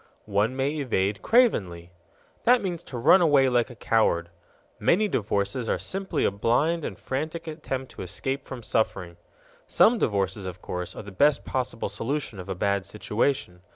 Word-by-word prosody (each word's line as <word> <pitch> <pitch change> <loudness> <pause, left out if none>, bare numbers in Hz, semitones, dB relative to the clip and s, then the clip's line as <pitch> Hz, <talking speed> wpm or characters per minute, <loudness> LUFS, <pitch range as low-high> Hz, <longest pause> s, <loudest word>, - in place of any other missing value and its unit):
One 105 +4 +1
may 140 +3 -1
evade 100 -7 0
cravenly._ 95 - +2 0.6
That 245 -1 +5
means 175 -3 -3
to 125 - -7
run 155 +10 +6
away 145 -5 +5
like 120 -1 +1
a 120 - -10
coward. 90 -7 +1 0.5
Many 210 +5 +3
divorces 105 - -1
are - - +1
simply 195 0 -1
a - - +2
blind 140 +11 +1
and - - -5
frantic 155 +5 -4
attempt 150 -5 -5
to - - -9
escape 130 +9 -3
from 125 -3 -8
suffering. 95 -6 -1 0.5
Some 230 +1 +4
divorces, 100 -1 -1
of 90 0 -7
course, 90 0 -5
are - - -7
the 100 - -10
best 145 +9 +3
possible 125 -3 -2
solution 135 -4 -3
of 90 - -8
a 95 - -2
bad 100 +1 0
situation. 105 -1 -2
120 Hz, 165 wpm, -26 LUFS, 100-150 Hz, 0.6 s, run